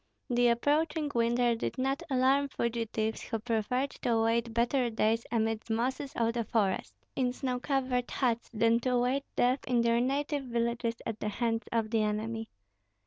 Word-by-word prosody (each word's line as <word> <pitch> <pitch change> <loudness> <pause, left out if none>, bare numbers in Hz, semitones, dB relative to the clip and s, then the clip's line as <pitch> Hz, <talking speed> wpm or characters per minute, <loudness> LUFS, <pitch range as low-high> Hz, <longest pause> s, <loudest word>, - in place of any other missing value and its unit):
The 245 0 +4
approaching 295 +5 +1
winter 235 +1 +2
did 230 - -3
not 270 +4 0
alarm 270 +2 +3
fugitives, 225 -3 -2
who 225 - -3
preferred 235 +4 -1
to 240 - +1
await 230 +1 +1
better 240 +2 +1
days 225 +1 +1
amid 225 -1 -1
mosses 255 +5 -1
of 230 0 +1
the 235 -1 -1
forest, 205 -3 0 0.2
in 255 -2 +1
snow 250 -1 -2
covered 255 -2 0
huts, 235 -3 0
than 230 0 +3
to 250 +1 -1
await 250 +3 +1
death 250 +2 +3
in 245 -2 +3
their 235 0 +3
native 280 +2 -1
villages 235 -1 -1
at 225 -2 -4
the 210 - -2
hands 225 +1 -1
of 225 -2 0
the 225 -2 +2
enemy. 220 +1 -2
235 Hz, 165 wpm, -30 LUFS, 225-255 Hz, 0.2 s, The